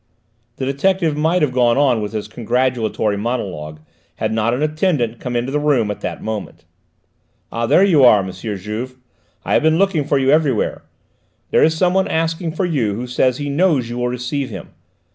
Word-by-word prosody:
The 130 Hz, -, -4 dB
detective 160 Hz, +4 st, +1 dB
might 160 Hz, +3 st, +1 dB
have 145 Hz, -, +1 dB
gone 120 Hz, -1 st, +2 dB
on 130 Hz, -6 st, +3 dB
with 105 Hz, +1 st, -5 dB
his 105 Hz, -1 st, -4 dB
congratulatory 115 Hz, -2 st, -1 dB
monologue 90 Hz, -10 st, -4 dB, 0.3 s
had -, -, -2 dB
not 110 Hz, +1 st, +1 dB
an 125 Hz, +5 st, -1 dB
attendant 150 Hz, -7 st, 0 dB
come 125 Hz, -1 st, -4 dB
into 120 Hz, +2 st, -1 dB
the 150 Hz, -, 0 dB
room 135 Hz, -8 st, +1 dB
at 105 Hz, -, -7 dB
that -, -, -5 dB
moment. 110 Hz, -2 st, -6 dB, 0.9 s
"Ah, 115 Hz, 0 st, -2 dB
there 185 Hz, -, +5 dB
you 165 Hz, -9 st, +4 dB
are, 105 Hz, -6 st, +6 dB
M. 95 Hz, -, -5 dB
Juve: 105 Hz, +6 st, -5 dB, 0.5 s
I -, -, -1 dB
have -, -, +4 dB
been 160 Hz, +1 st, +3 dB
looking 190 Hz, -5 st, +2 dB
for 140 Hz, 0 st, +1 dB
you 135 Hz, 0 st, +2 dB
everywhere. 145 Hz, -7 st, +1 dB, 0.7 s
There -, -, +4 dB
is 160 Hz, 0 st, +3 dB
someone 185 Hz, +2 st, +2 dB
asking 165 Hz, 0 st, -1 dB
for 185 Hz, +3 st, -1 dB
you 125 Hz, -, 0 dB
who 120 Hz, +4 st, -4 dB
says 125 Hz, 0 st, +1 dB
he 145 Hz, -, -4 dB
knows 145 Hz, -7 st, +1 dB
you 120 Hz, -, -4 dB
will 125 Hz, -, 0 dB
receive 125 Hz, +3 st, -3 dB
him. 95 Hz, -6 st, -8 dB
130 Hz, 190 wpm, -19 LUFS, 115-155 Hz, 0.9 s, are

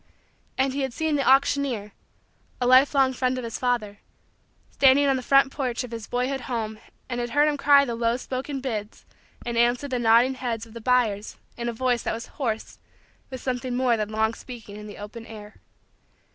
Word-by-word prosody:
And 265 Hz, 0 st, +1 dB
he 280 Hz, -, -2 dB
had 265 Hz, -2 st, -2 dB
seen 315 Hz, +1 st, 0 dB
the 275 Hz, -2 st, +1 dB
auctioneer 270 Hz, -5 st, +2 dB, 0.7 s
a 250 Hz, -, 0 dB
lifelong 260 Hz, +1 st, +5 dB
friend 255 Hz, 0 st, 0 dB
of 255 Hz, -, -4 dB
his 230 Hz, -1 st, -5 dB
father 225 Hz, -5 st, -1 dB, 0.7 s
standing 275 Hz, +1 st, +5 dB
on 275 Hz, -1 st, +3 dB
the 260 Hz, -, -2 dB
front 275 Hz, +1 st, +4 dB
porch 255 Hz, -4 st, -2 dB
of 250 Hz, -, -8 dB
his 225 Hz, -2 st, -6 dB
boyhood 255 Hz, +2 st, -1 dB
home 220 Hz, -4 st, -4 dB, 0.3 s
and 245 Hz, -1 st, -3 dB
had 240 Hz, 0 st, -2 dB
heard 290 Hz, +4 st, +3 dB
him 300 Hz, -, +1 dB
cry 280 Hz, 0 st, +5 dB
the 240 Hz, -, -3 dB
low 230 Hz, +1 st, 0 dB
spoken 265 Hz, +2 st, -5 dB
bids 220 Hz, -5 st, -5 dB, 0.4 s
and 235 Hz, -1 st, -1 dB
answer 240 Hz, +4 st, +2 dB
the 255 Hz, -3 st, -2 dB
nodding 235 Hz, +3 st, +4 dB
heads 235 Hz, -3 st, -4 dB
of 225 Hz, -, -16 dB
the 230 Hz, -, -8 dB
buyers 220 Hz, -4 st, +1 dB, 0.2 s
in 240 Hz, 0 st, -3 dB
a -, -, -1 dB
voice 245 Hz, 0 st, 0 dB
that -, -, -2 dB
was 230 Hz, -, -7 dB, 0.2 s
hoarse 225 Hz, -4 st, -3 dB, 0.5 s
with 260 Hz, -2 st, -7 dB
something 250 Hz, -1 st, -3 dB
more 250 Hz, -2 st, +2 dB
than 215 Hz, -2 st, -2 dB
long 220 Hz, +1 st, 0 dB
speaking 230 Hz, -4 st, -10 dB
in 210 Hz, 0 st, -9 dB
the 205 Hz, -, -10 dB
open 210 Hz, +3 st, -8 dB
air. 210 Hz, -1 st, -11 dB
245 Hz, 200 wpm, -25 LUFS, 225-265 Hz, 0.7 s, lifelong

